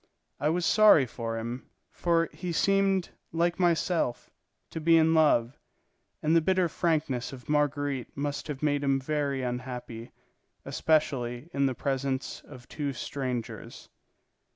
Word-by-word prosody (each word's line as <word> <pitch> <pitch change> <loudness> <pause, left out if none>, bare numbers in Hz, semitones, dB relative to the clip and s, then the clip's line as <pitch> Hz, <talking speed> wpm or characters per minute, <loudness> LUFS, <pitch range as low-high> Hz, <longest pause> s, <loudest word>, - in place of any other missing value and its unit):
I 150 - +1
was 170 +2 0
sorry 210 -10 +6
for 115 -1 -5
him, 120 +3 -6 0.2
for 165 -1 +1
he 180 -1 -5
seemed, 195 +1 +2 0.2
like 170 +2 0
myself, 170 -6 0 0.4
to 160 - -5
be 165 +1 +5
in 160 0 +4
love, 140 -6 +3 0.6
and 155 +2 +3
the 165 - +5
bitter 185 +2 +2
frankness 155 -7 -1
of 130 -2 -11
Marguerite 145 -4 -1
must 145 +1 -3
have 150 -2 -6
made 145 -1 +1
him 135 -1 +2
very 140 -1 -1
unhappy, 125 -2 -5 0.5
especially 140 -3 0
in 140 0 +2
the 130 - -2
presence 135 -1 -2
of 125 -3 -13
two 145 -2 -3
strangers. 125 -1 -5
145 Hz, 135 wpm, -28 LUFS, 130-165 Hz, 0.6 s, sorry